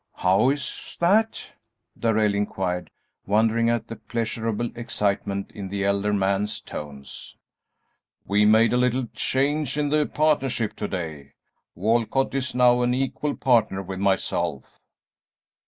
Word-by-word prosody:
"How 95 +7 +3
is 140 -1 -4
that?" 210 +6 +2 0.4
Darrell 110 -2 +2
inquired, 95 -3 -2 0.4
wondering 110 +3 +3
at 120 -1 -1
the 115 - -7
pleasurable 115 0 -3
excitement 100 -4 -2
in 100 -2 -7
the 100 0 -2
elder 100 +1 +1
man's 100 +1 0
tones. 70 -2 -9 0.9
"We 105 +1 +3
made 110 +2 +5
a - - +3
little 125 +1 +1
change 140 +1 0
in 145 -1 +1
the 150 0 +2
partnership 135 -7 +1
to 105 - -3
day: 80 -7 -6 0.4
Walcott 115 +7 +1
is 130 -2 -2
now 125 -1 +5
an 125 0 +2
equal 135 +3 -1
partner 110 -7 +2
with 95 0 -6
myself." 85 -6 -1
110 Hz, 125 wpm, -24 LUFS, 100-125 Hz, 0.9 s, made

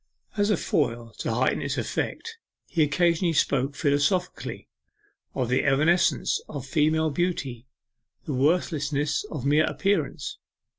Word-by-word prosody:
As 205 0 +1
a 210 - +3
foil 120 -8 -1
to - - -2
heighten - - +1
its - - -2
effect, 455 0 -3 0.3
he 170 - -1
occasionally 170 +3 +2
spoke 140 -2 +1
philosophically 150 +6 0 0.7
of 125 - 0
the 125 +2 +1
evanescence 155 +6 +2
of 140 -4 -6
female 155 +3 +2
beauty 140 -7 -2 0.6
the 150 - -3
worthlessness 145 0 +1
of 140 -4 -5
mere 150 +2 +4
appearance. 205 - -1
150 Hz, 120 wpm, -26 LUFS, 140-175 Hz, 0.7 s, mere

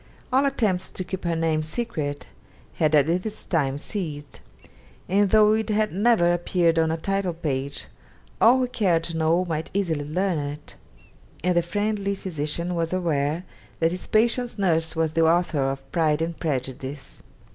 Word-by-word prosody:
All 270 +2 +4
attempts 205 -9 0
to 185 - -5
keep 185 0 -6
her 170 -1 +1
name 160 -1 +1
secret 155 -5 -3 0.5
had 155 -1 +3
at 145 -2 +5 0.2
this 215 +1 -5
time 140 -5 0
ceased, 150 -4 -5 0.7
and 200 +2 +3
though 215 0 +5
it 220 +1 -1
had 215 -1 +1
never 200 -3 +3
appeared 175 -1 +1
on 160 0 +2
a 160 - -1
title 195 0 -1
page, 140 -4 -2 0.6
all 240 +3 +7
who 255 -1 +1
cared 185 -9 +1
to 165 0 -5
know 165 +3 +2
might 160 -2 -3
easily 165 -7 0
learn 180 +2 0
it: 145 +1 -6 0.7
and 180 0 +2
the 175 - +4
friendly 200 +2 -1
physician 170 -1 -3
was 165 0 -1
aware 165 -1 0 0.3
that 165 0 +2
his 180 0 -3
patient's 235 +2 +1
nurse 165 -5 +1
was 160 -1 0
the 165 - +2
author 160 -5 +2
of 135 0 -7
'Pride 160 -2 +2
and 165 0 -4
Prejudice.' 135 -1 -4
170 Hz, 165 wpm, -24 LUFS, 155-195 Hz, 0.7 s, all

